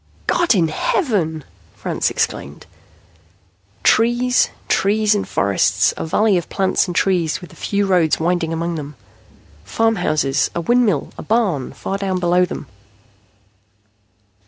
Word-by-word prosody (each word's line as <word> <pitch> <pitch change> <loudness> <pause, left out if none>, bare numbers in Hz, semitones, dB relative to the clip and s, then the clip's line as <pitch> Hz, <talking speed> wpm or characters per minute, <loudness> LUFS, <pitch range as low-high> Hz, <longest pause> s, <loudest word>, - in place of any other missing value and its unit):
"God 345 -8 +2
in 165 -4 +2
heaven!" 160 - -1 0.3
Franks - - -1
exclaimed. - - -3 1.2
Trees, 240 +2 +3 0.2
trees 210 +2 +2
and 205 - -2
forests. 100 0 +1
A - - -5
valley 210 +4 +2
of 170 - -10
plants 190 0 +1
and 175 - -5
trees, 175 -5 +1
with 180 - -12
a - - -16
few 200 0 -1
roads 180 -5 +2
winding 170 0 0
among 165 +1 -2
them. 150 -2 -6 0.7
Farmhouses. 155 - 0
A 170 - -1
windmill. 220 - +1
A - - -4
barn, 205 - 0
far 195 - -5
down 190 -2 -1
below 180 +1 +3
them. 175 - -7
180 Hz, 130 wpm, -19 LUFS, 160-210 Hz, 1.2 s, Trees